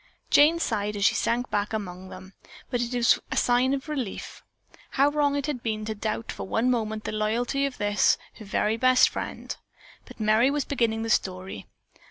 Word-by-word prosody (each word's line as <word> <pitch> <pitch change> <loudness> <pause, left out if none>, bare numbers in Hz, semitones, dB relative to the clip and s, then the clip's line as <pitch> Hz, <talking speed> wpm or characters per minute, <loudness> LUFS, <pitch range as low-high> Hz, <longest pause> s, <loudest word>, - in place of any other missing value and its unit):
Jane 305 +3 +6
sighed 210 -9 -1
as 200 0 0
she - - +5
sank 235 +3 -1
back 205 +1 -1
among 185 -3 -5
them, 190 +1 -11 0.4
but 245 -2 0
it 240 0 -2
was 240 -1 +4
a - - -2
sigh 245 0 +3
of 275 +2 -2
relief. 265 -9 -5 0.5
How 275 +2 +3
wrong 290 -1 +1
it 285 -1 -1
had 290 -5 -3
been 215 -2 -3
to 220 - -2
doubt 215 +2 -3
for - - -7
one 235 +5 +1
moment 220 -3 -2
the - - -3
loyalty 235 +6 0
of 270 - -8
this, 205 0 +3 0.2
her 215 - -9
very 210 +2 0
best 255 +1 +5
friend. - - -5 0.5
But - - -14
Merry 220 +4 +4
was 290 0 -1
beginning 225 -5 0
the 225 - -2
story. 185 - -2
225 Hz, 195 wpm, -26 LUFS, 210-255 Hz, 0.5 s, Jane